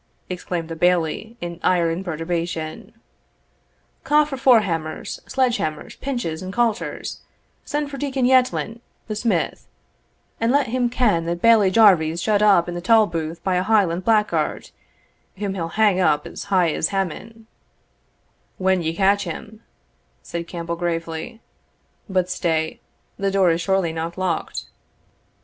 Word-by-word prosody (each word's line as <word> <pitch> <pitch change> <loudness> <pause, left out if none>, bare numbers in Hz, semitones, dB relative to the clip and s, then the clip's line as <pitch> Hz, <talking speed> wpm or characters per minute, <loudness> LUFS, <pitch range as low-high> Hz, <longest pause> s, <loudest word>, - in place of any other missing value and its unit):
exclaimed 175 -2 -4
the 165 - -6
Bailie, 180 +6 0
in 170 0 -5
ire 170 -2 +2
and 175 +3 -3
perturbation. 165 -1 -4 1.1
"Ca' 300 +1 +4
for 295 -2 -5
forehammers, 200 -12 +1
sledge 255 -2 +1
hammers, 155 -1 -4
pinches, 240 -13 -3
and 185 0 -5
coulters; 230 +1 -2 0.4
send 295 -1 -2
for 275 - -6
Deacon 270 -3 -1
Yettlin, 250 -3 +2 0.3
the 215 - -3
smith, 225 +2 -1 0.7
an 230 - +1
let 280 +2 +3
him 245 0 +1
ken 215 -9 +1
that 170 0 -2
Bailie 220 -2 +5
Jarvie's 180 -6 +4
shut 210 +3 +1
up 195 -5 +5
in 175 - -4
the 175 - -5
tolbooth 170 -6 +2
by 185 -2 +1
a - - +2
Highland 190 -4 +2
blackguard, 215 0 +1 0.7
whom 200 -1 -2
he'll 170 -4 -3
hang 210 -4 +4
up 150 -5 +2
as - - -7
high 185 -4 +2
as 160 - 0
Haman" 200 +5 -4 1.1
"When 190 -1 +2
ye 165 0 -2
catch 200 +2 +2
him," 210 +6 -8 0.6
said 170 0 -5
Campbell, 170 -1 -4
gravely; 165 +4 -4 0.7
"but 185 -2 +1
stay 160 -3 -1 0.4
the 195 0 +1
door 190 -3 +3
is 165 +1 0
surely 190 -3 +1
not 165 +2 -4
locked." 185 -3 -2
185 Hz, 140 wpm, -22 LUFS, 170-225 Hz, 1.1 s, Bailie